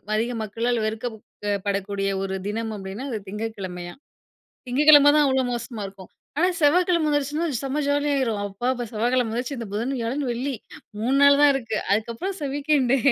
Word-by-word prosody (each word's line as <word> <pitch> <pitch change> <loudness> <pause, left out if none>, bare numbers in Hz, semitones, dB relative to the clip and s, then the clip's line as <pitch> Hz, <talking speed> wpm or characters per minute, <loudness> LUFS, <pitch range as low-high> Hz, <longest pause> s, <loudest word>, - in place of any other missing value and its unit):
அதிக 235 +3 0
மக்களால் 230 +2 -1
வெறுக்கப்ப் 220 0 -4 0.4
படக்கூடிய 195 0 -1
ஒரு 190 0 -3
தினம் 220 +1 -3
அப்படின்னா, 195 +7 -6
அது 220 - -2
திங்கட்கிழமையாம். 195 -3 -6 0.7
திங்ககிழமை 290 +2 +7
தான், 295 -1 +5
அவ்ளோ 265 -1 +2
மோசமா 235 -2 -5
இருக்கும். 195 -1 -14 0.3
ஆனா, 360 +2 +4
செவ்வாக்கிழமை 340 +1 +3
வந்துருச்சினா 295 +3 0 0.2
செம்ம 275 +2 -2
ஜாலியாயிரும். 280 -7 +1
"அப்பா" 200 +5 -5
அப்ப 245 -1 -4
செவ்வாக்கிழமை 240 +1 +1
வந்துருச்சு, 250 +4 -3
இந்த 230 - -5
புதன், 240 +6 -1
வியாழன், 255 +5 -2
வெள்ளி, 260 +3 -2 0.5
3 260 +5 +2
நாள் 280 0 +7
தான் 290 -1 +7
இருக்கு. 225 -5 -2 0.2
அதுக்கப்புறம் 235 - -2
ச - - -3
வீக்கெண்டு 280 -3 +2
245 Hz, 155 wpm, -24 LUFS, 215-285 Hz, 0.7 s, திங்ககிழமை